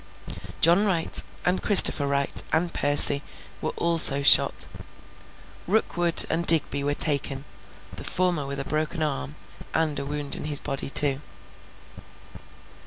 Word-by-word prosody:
John 170 +5 +3
Wright, 180 -6 -2 0.2
and 180 +1 -3
Christopher 175 -8 +6
Wright, 140 0 -5
and 170 +2 -4
Percy, 145 0 +4 0.4
were 155 - -5
also 160 -4 +4
shot. - - +2 1.0
Rookwood 175 -4 +1
and 170 +1 -6
Digby 145 -3 +1
were 145 +1 -4
taken: 140 -2 -4 0.5
the - - -12
former 175 -6 -4
with 140 0 -8
a 140 - -7
broken 155 +2 -5
arm 75 - -7 0.4
and 155 -3 -4
a 140 - -8
wound 145 -1 -6
in - - -10
his 150 -2 +3
body 135 0 -6
too. 140 0 +2
150 Hz, 130 wpm, -21 LUFS, 140-170 Hz, 1.0 s, Christopher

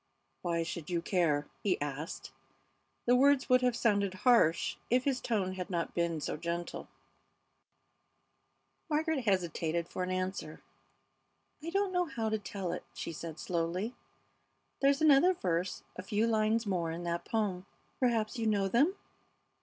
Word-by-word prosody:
"Why 170 -2 0
should 165 -1 -5
you 175 -1 +1
care?" 165 -5 +1 0.2
he 195 -3 +1
asked. 145 +2 -5 0.7
The 245 - +5
words 275 +1 +4
would 255 0 +6
have 250 -2 +2
sounded 200 -5 +1
harsh 230 -10 +4
if 250 +2 +3
his 270 -2 0
tone 195 -5 0
had 185 -1 -5
not 170 -3 -2
been 170 -2 0
so 150 - -3
gentle. 170 +2 -4 2.0
Margaret 310 -3 0
hesitated 170 -4 0
for - - -5
an 180 - -1
answer. 185 -4 -3 1.0
"I 325 - -5
don't 395 +2 +1
know 360 0 +2
how 230 -9 -2
to 220 0 0
tell 195 -3 -4
it," 180 - -4
she - - -4
said, 160 0 -7
slowly. 180 +6 -2 0.9
"There's 275 +2 +4
another 310 +5 +6
verse, 180 - -1
a - - -5
few 205 +4 0
lines 220 0 +2
more 180 -5 0
in 165 +2 -4
that 170 0 -2
poem, 200 -4 -1 0.3
perhaps 235 -3 +1
you 225 - 0
know 200 -2 +2
them? 280 - +3
195 Hz, 150 wpm, -32 LUFS, 170-240 Hz, 2.0 s, would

